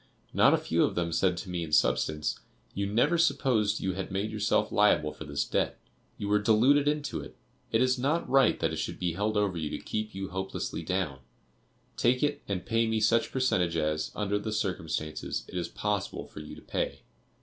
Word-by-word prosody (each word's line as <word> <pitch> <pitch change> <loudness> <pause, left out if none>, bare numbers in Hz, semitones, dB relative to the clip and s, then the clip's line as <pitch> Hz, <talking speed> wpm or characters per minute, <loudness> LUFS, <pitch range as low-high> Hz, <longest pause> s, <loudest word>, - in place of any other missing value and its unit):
Not - - +6
a - - +4
few - - +1
of - - 0
them 85 -1 -1
said 90 0 +2
to 95 - -6
me 90 -1 -2
in 80 - -7
substance: 75 0 +1 0.3
"you 100 0 -1
never 120 +11 +2
supposed 130 -9 +2
you 95 - -1
had 95 +1 -4
made 100 +3 -2
yourself 105 -2 +1
liable 75 0 +3
for 80 - -9
this 70 -1 -1
debt; - - 0 0.4
you 100 - -4
were 105 +1 +3
deluded 125 +7 +4
into 150 0 -1
it; - - -9 0.4
it 115 +3 +3
is 130 0 +2
not 150 +6 0
right 135 0 +4
that - - +1
it - - -3
should - - -3
be 90 -2 -1
held 105 +4 -1
over 100 -4 +1
you 75 -2 -2
to - - -3
keep 110 -1 -4
you 95 0 -4
hopelessly 95 0 -4
down; 90 -8 -2 0.8
take 125 +3 +2
it, 145 0 0
and 95 -3 -3
pay 115 0 +2
me 110 0 +1
such 115 +2 +2
percentage 90 -10 +1
as, 75 0 -1
under 105 -1 0
the 110 +1 -4
circumstances, 80 -7 -2
it - - -11
is 85 -2 -1
possible 105 +1 -2
for - - -11
you 75 - -8
to - - -14
pay." - - -3
105 Hz, 205 wpm, -29 LUFS, 85-115 Hz, 0.8 s, Not